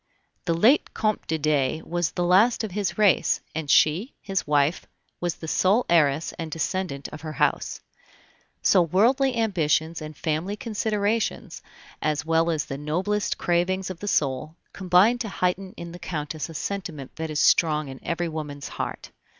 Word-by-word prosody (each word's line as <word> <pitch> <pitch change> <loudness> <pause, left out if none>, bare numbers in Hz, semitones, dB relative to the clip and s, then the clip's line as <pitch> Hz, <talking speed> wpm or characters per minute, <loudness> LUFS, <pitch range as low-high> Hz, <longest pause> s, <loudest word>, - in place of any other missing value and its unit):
The 170 -1 +1
late 235 - +3
Comte 215 -1 -1
de 160 - 0
Dey 155 0 0
was 175 -1 -2
the 175 - -1
last 200 +8 +4
of 215 - -4
his 200 0 -2
race, 200 -6 +3
and 155 -2 -4
she, 170 - +3
his 195 -5 -3
wife, 145 +2 +1 0.3
was 175 -1 -1
the 160 - -9
sole 195 +9 +2
heiress 155 -2 +3
and 165 -1 -4
descendant 165 -3 -3
of 155 - -9
her 155 -1 -6
house. - - 0 0.8
So 185 - +5
worldly 240 - +3
ambitions 165 -6 +1
and 155 -1 -8
family 165 +5 -2
considerations, 215 0 -2 0.4
as 150 -2 -1
well 165 +1 +2
as 155 -3 0
the 135 - -6
noblest 185 +8 -1
cravings 185 +2 0
of 175 - -9
the 205 - -6
soul, 150 -2 0 0.2
combined 195 +6 +3
to 220 - -3
heighten 185 0 -1
in 170 0 -7
the 175 - -10
Countess 155 -1 -4
a 165 - -10
sentiment 165 -8 -5
that 160 0 -3
is 150 -1 -2
strong 155 -1 +3
in 135 -1 -8
every 170 +1 -2
woman's 150 -3 -6
heart. - - -5
170 Hz, 165 wpm, -25 LUFS, 155-195 Hz, 0.8 s, So